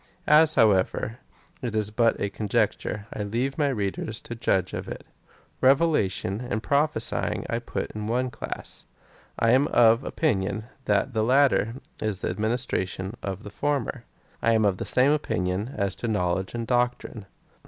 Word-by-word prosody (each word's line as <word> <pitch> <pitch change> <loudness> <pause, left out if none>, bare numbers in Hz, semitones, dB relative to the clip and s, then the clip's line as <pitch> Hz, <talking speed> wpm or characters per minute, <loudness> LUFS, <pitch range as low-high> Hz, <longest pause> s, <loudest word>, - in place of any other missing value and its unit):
As, 155 +1 +6
however, 110 +2 +2 0.4
it 120 -3 -3
is 105 -1 +2
but 115 +1 +2
a 100 - -2
conjecture, 105 0 -1
I - - -4
leave 120 +8 -2
my 145 - +3
readers 110 -3 -2
to - - -7
judge 95 -5 0
of - - -5
it. - - -7 0.6
Revelation 130 - +2
and 110 +1 -2
prophesying 145 +2 0
I - - -1
put - - -4
in 105 0 -5
one 125 +2 0
class, 110 - -6 0.5
and 115 - +2
I - - +5
am 135 +3 +4
of 115 -1 +4
opinion 105 - -1 0.2
that 105 +5 +1
the 110 -1 +1
latter 130 -2 +3 0.3
is 105 -3 -1
the - - -1
ad - - -7
ministration 105 -4 0
of 100 +1 -5
the 105 - -9
former. 135 -2 -2 0.4
I 115 - +3
am 110 -1 +3
of 100 -2 +2
the - - -4
same 130 +3 +3
opinion 100 -6 -1
as 100 -2 0
to 120 - -2
knowledge 95 -1 -1
and 115 -1 -3
doctrine. 120 -3 -1
110 Hz, 165 wpm, -26 LUFS, 100-125 Hz, 0.6 s, As